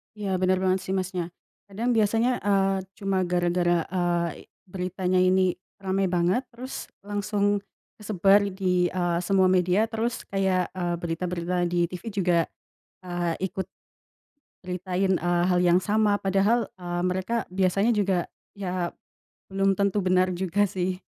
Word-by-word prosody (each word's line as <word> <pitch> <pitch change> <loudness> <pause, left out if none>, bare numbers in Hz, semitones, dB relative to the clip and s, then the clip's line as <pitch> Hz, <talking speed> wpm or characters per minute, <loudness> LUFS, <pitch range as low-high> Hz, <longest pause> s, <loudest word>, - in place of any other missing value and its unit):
Iya, 205 -2 -5
bener 185 0 +3
banget 185 0 +2
sih, 190 - -2
Masnya, 185 -1 -2 0.4
kadang 220 +5 -2
biasanya, 225 +3 +3 0.2
eee, 195 -1 +3 0.3
cuma 195 -1 0
gara-gara, 175 0 +2 0.2
eee, 175 -2 -1 0.2
beritanya 185 0 -1
ini 185 -1 +3 0.2
rame 190 0 0
banget 175 +6 +2
terus 255 +3 -7 0.2
langsung 205 0 0 0.4
kesebar 200 -1 +4 0.2
di 180 -2 +2
eee, 175 -2 0
semua 190 0 +4
media 185 +3 +3
terus 230 +1 -2
kayak, 190 -2 0
eee, 175 -2 -2
berita-berita 175 +1 -2
di 175 0 -1
TV 180 - -7
juga, 180 -4 +2 0.7
eee, 175 -1 -1 0.2
ikut 190 +1 -4 1.0
nyeritain, 185 +1 -1
eee, 175 0 +1
hal 180 -1 +3
yang 175 +1 +5
sama 210 0 +2
padahal, 195 +4 +2
eee, 175 -1 -3
mereka 185 +5 -1
biasanya 190 +4 +2
juga 190 -4 +1 0.3
ya 180 -3 -2 0.6
belum 195 0 +2
tentu 200 0 +1
benar 185 0 +3
juga 190 +3 0
sih. 185 -1 -3
185 Hz, 135 wpm, -26 LUFS, 180-195 Hz, 1.0 s, yang